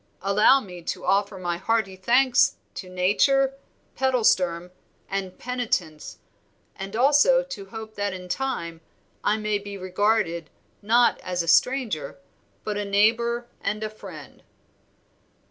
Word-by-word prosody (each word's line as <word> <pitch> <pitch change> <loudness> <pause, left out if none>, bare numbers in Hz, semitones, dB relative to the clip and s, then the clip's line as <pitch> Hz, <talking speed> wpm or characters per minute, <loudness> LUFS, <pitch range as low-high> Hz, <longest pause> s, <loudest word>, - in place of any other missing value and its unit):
"Allow 210 +7 +5
me 180 -5 -10
to - - -5
offer 200 +1 +1
my 175 -2 -2
hearty 195 0 0
thanks 245 +6 +3 0.2
to 185 - -8
Nature, 235 +10 +2 0.4
Pedalsturm, 185 -9 +1 0.4
and 195 -2 -4
Penitence, 220 -11 -3 0.6
and 195 +2 -7
also 290 - +4
to - - -8
hope 220 -1 -9
that 205 -1 -2
in 185 -1 -8
time 180 -7 -3 0.4
I 210 - +2
may 210 -1 -1
be 200 0 -8
regarded, 185 -3 0 0.3
not 235 +3 +3
as 180 -1 -2
a - - -8
stranger, 215 - +1 0.5
but 210 -1 -3
a - - -1
neighbor 230 +4 +2 0.2
and 210 +2 -2
a 215 - -3
friend." 185 -8 -12
205 Hz, 130 wpm, -24 LUFS, 185-240 Hz, 0.6 s, Allow